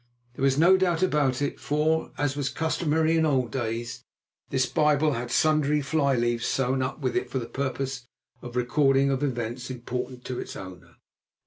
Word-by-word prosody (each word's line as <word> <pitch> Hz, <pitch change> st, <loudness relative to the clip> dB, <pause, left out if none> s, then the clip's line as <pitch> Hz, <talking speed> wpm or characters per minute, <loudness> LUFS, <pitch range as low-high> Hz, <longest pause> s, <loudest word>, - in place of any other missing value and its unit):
There 125 Hz, -, -10 dB
was 135 Hz, 0 st, +3 dB
no 175 Hz, +5 st, +6 dB
doubt 180 Hz, -2 st, +1 dB
about 145 Hz, -6 st, +1 dB
it, 145 Hz, -, -3 dB
for, 155 Hz, +2 st, 0 dB
as 145 Hz, -1 st, 0 dB
was 140 Hz, -2 st, -1 dB
customary 160 Hz, 0 st, +1 dB
in 160 Hz, -, +3 dB
old 130 Hz, -6 st, +1 dB
days, 120 Hz, -1 st, -3 dB, 0.5 s
this 130 Hz, -1 st, +1 dB
Bible 150 Hz, +3 st, +2 dB
had 120 Hz, 0 st, -4 dB
sundry 150 Hz, +1 st, +2 dB
fly 140 Hz, -1 st, +1 dB
leaves 120 Hz, -1 st, 0 dB
sewn 130 Hz, 0 st, 0 dB
up 130 Hz, +3 st, -3 dB
with 130 Hz, -2 st, -1 dB
it -, -, -1 dB
for -, -, -3 dB
the 120 Hz, -, -2 dB
purpose 130 Hz, -1 st, -4 dB, 0.3 s
of 120 Hz, -, -8 dB
the 125 Hz, -, 0 dB
recording 135 Hz, +2 st, +3 dB
of 135 Hz, 0 st, -1 dB
events 120 Hz, -2 st, -3 dB
important 125 Hz, 0 st, -5 dB
to 125 Hz, -, -4 dB
its -, -, -6 dB
owner. 90 Hz, -2 st, -10 dB
135 Hz, 185 wpm, -26 LUFS, 125-150 Hz, 0.5 s, no